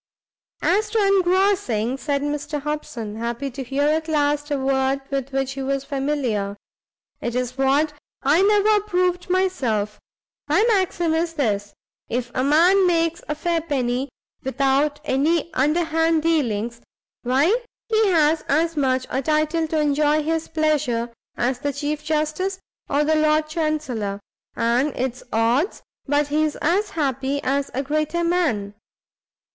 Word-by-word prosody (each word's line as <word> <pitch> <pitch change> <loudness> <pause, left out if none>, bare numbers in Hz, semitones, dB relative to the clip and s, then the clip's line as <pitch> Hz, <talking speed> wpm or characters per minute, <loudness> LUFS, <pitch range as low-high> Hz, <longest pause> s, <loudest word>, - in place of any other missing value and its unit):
"As 420 +4 +2
to 435 -2 +2
engrossing," 370 - +2
said 280 0 -2
Mr 295 0 -3
Hobson, 255 -7 -5
happy 235 +4 -3
to 270 +2 -6
hear 270 +3 -1
at 315 +2 +1
last 295 -1 +1
a 290 - 0
word 265 0 +1
with 275 -1 -2
which 270 -1 -1
he 270 0 -5
was 275 0 -1
familiar, 270 -9 -2 0.6
"it's 250 +1 -2
what 280 +3 +2 0.3
I 295 +6 +4
never 420 +1 +4
approved 365 -3 0
myself. 255 - 0 0.5
My 335 +9 +3
maxim 360 -5 +1
is 330 +1 -1
this; 205 -7 -1 0.3
if 245 0 -2
a 255 - 0
man 350 +7 +5
makes 335 -1 +1
a 300 - 0
fair 335 +1 0
penny, 265 -4 -1 0.3
without 275 +3 +1
any 310 +4 +1
underhand 325 +2 +2
dealings, 235 -8 0 0.4
why 285 - +2 0.3
he 440 -1 +3
has 320 -3 +3
as 325 +3 +2
much 260 -3 +1
a 265 - 0
title 310 +3 +1
to 315 0 0
enjoy 300 +1 +2
his 320 +1 -1
pleasure 295 -7 0 0.3
as 245 +1 0
the 285 - -1
Chief 290 +1 -3
Justice, 310 +5 -1 0.3
or 290 +1 +2
the 310 +1 +2
Lord 310 0 +2
Chancellor: 305 -11 -2 0.4
and 245 +5 +1
it's 255 0 -3
odds 235 - +1 0.2
but 290 +1 +1
he's 305 0 +1
as 355 +7 +1
happy 275 -2 -1
as 275 +1 0
a 270 - 0
greater 310 +4 -1
man. 305 - 0
295 Hz, 140 wpm, -22 LUFS, 265-325 Hz, 0.6 s, man